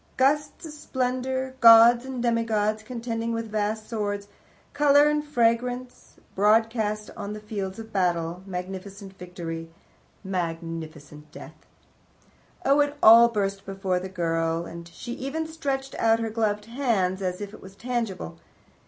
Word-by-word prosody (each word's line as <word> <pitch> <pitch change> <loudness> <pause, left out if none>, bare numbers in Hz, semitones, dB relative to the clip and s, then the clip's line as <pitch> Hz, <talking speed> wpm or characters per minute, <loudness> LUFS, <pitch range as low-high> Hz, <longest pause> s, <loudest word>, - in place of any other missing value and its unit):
Gusts 295 +4 +1
of 315 - -7
splendour, 260 -2 -2
gods 235 +1 +8
and 260 -2 -4
demigods 220 -2 +1
contending 230 0 -4
with 230 -1 -4
vast 215 +1 -2
swords, 205 -3 -3 0.5
colour 290 0 +5
and 300 0 +1
fragrance 245 -2 -1 0.2
broadcast 215 0 +1
on 205 -1 -5
the 210 - -7
field 200 -3 -5
of 225 0 -10
battle, 175 -2 0
magnificent 190 +2 -7
victory, 165 -2 -6 0.5
magnificent 165 -4 -5
death! 170 - -13 1.0
Oh, 275 +2 +4
it 290 0 +1
all 230 +2 +9
burst 200 -3 -2
before 195 -2 -2
the 190 +1 -6
girl, 165 -2 -1
and 170 0 -9
she 205 +8 -9
even 275 +6 -4
stretched 275 -4 -4
out 225 0 +4
her 225 -1 -3
gloved 210 -2 -1
hands 220 -7 0
as 180 -1 -2
if 205 0 -7
it - - -12
was 190 +1 -13
tangible. 200 - -4
215 Hz, 135 wpm, -25 LUFS, 185-245 Hz, 1.0 s, all